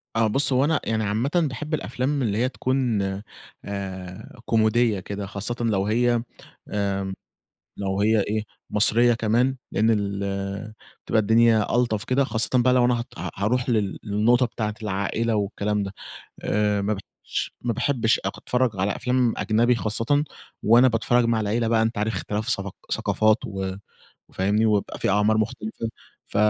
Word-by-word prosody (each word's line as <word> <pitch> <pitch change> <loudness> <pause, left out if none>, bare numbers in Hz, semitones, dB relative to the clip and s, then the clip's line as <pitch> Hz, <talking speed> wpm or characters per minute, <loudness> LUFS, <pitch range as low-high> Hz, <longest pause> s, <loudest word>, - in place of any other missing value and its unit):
آه، 115 -1 +3
بُص 135 +4 +5
هو 130 +3 +3
أنا 155 0 +2
يعني 110 -1 -1
عامةً 110 +6 0 0.2
باحب 150 +4 -6
الأفلام 140 0 -1
اللي 105 -3 0
هي 125 +2 +1
تكون 130 -4 0 0.6
آآ 95 +1 -7
كوميدية 110 -1 +2
كده، 100 +1 -5
خاصةً 100 +4 -2
لو 105 -4 +1
هي 120 +2 +2 0.5
آمم 100 -1 -2 0.6
لو 95 0 -2
هي 110 +1 +3
إيه 105 +2 -1 0.3
مصرية 115 +3 +4
كمان، 120 +4 +1 0.2
لأن 110 +2 +2
ال 100 0 -2 0.3
بتبقى 110 - +2
الدنيا 110 0 +3
ألطف 115 -4 +1
كده، 135 +2 +2
خاصةً 110 -2 0
بقى 125 0 +4
لو 125 -1 +4
أنا 125 - +3
ه - - -4
ه - - -4
هاروح 120 +6 0
لل 105 -4 0
للنقطة 115 +4 +3
بتاعة 105 -2 -3
العائلة 105 +3 -1
والكلام 105 0 -1
ده، 100 -1 -5 0.5
آآ 105 -1 +1
ما 105 +2 0
باحبش 100 - -6
ما 120 -1 -1
باحبش 115 -1 +1
أق - - -3
أتفرّج 125 0 0
على 100 +2 0
أفلام 125 -2 +1
أجنبي 120 +3 +2
خاصةً 115 +6 0 0.4
وأنا 120 +4 +6
باتفرّج 115 +1 +2
مع 115 -1 +1
العيلة 110 +2 0
بقى 110 -1 +3
أنت 110 0 0
عارف 105 +2 0
اختلاف 105 +3 -3
ثافق 100 0 -1 0.2
ثقافات 110 +1 +2
و 95 -1 -4 0.5
و - - -25
فاهمني؟ 105 +4 +1
وبيبقى 105 -2 0
في - - -1
أعمار 105 +2 +3
مختلفة 110 +1 -3 0.4
ف - - -7
110 Hz, 160 wpm, -24 LUFS, 100-120 Hz, 0.6 s, وأنا